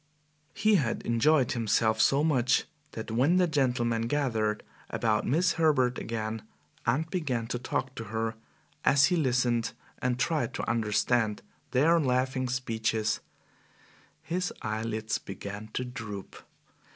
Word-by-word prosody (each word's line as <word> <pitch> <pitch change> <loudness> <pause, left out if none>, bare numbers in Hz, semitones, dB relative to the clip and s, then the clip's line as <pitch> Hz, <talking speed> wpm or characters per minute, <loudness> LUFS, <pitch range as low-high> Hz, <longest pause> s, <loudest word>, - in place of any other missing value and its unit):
He 215 0 +4
had 125 -9 -1
enjoyed 125 +3 +3
himself 110 -1 +2
so 140 +2 +4
much 130 -5 +3 0.3
that 110 0 -6
when 130 +10 +3
the 185 0 +5
gentlemen 120 -7 +1
gathered 115 -6 0 0.3
about 110 -2 0
Miss 165 +7 +3
Herbert 130 -6 +3
again 110 -1 -3 0.5
and 140 +8 +2
began 135 -11 -1
to 120 - -2
talk 130 +1 -2
to 115 - -6
her, 110 +1 -2 0.5
as 140 0 +5
he 180 - +2
listened 125 -6 +1 0.3
and 125 -1 0
tried 140 -2 0
to - - -3
understand 110 0 +1 0.3
their 160 +6 +4
laughing 130 -2 0
speeches, 115 -3 -1 1.0
his 180 +2 -2
eyelids 110 0 -2
began 100 +2 -7
to 125 - -2
droop. 105 -5 -7
120 Hz, 125 wpm, -29 LUFS, 110-140 Hz, 1.0 s, the